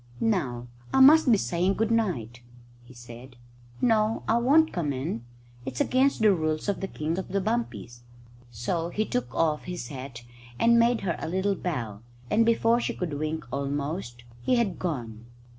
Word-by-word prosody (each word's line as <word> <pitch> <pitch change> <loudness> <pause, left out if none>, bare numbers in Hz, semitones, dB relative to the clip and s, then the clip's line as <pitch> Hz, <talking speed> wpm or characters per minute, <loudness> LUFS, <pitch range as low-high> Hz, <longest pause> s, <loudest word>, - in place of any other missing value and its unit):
"Now 125 -10 -3 0.3
I - - +3
must 285 0 +7
be 220 - +6
saying 185 +1 0
good 225 +1 0
night," 125 - -1 0.4
he 125 - -15
said. 120 +2 -12 0.5
"No, 225 -2 +2
I 230 +1 +3
won't 300 +6 +4
come 160 -5 -1
in. 130 -3 -4 0.4
It's 130 0 -6
against 260 -1 +2
the 210 -2 +6
rules 155 -3 -1
for 200 - +1
the 195 - -5
King 160 +1 -3
of 190 - -5
the 195 - -1
Bumpies." 195 - -3 0.5
So 165 +9 -3
he 215 +4 -1
took 125 - -2
off 155 -2 +1
his 180 -9 -6
hat 130 -3 -8 0.3
and 235 - +4
made 235 0 +3
her 180 -4 -2
a - - -4
little 190 +3 0
bow, 120 - -4 0.3
and 230 +1 +3
before 230 +1 +3
she - - -2
could 175 -5 -4
wink 155 0 -3
almost, 140 -2 -3 0.2
he 185 - +2
had 225 -7 0
gone. 120 -9 -4
170 Hz, 175 wpm, -27 LUFS, -, 0.5 s, must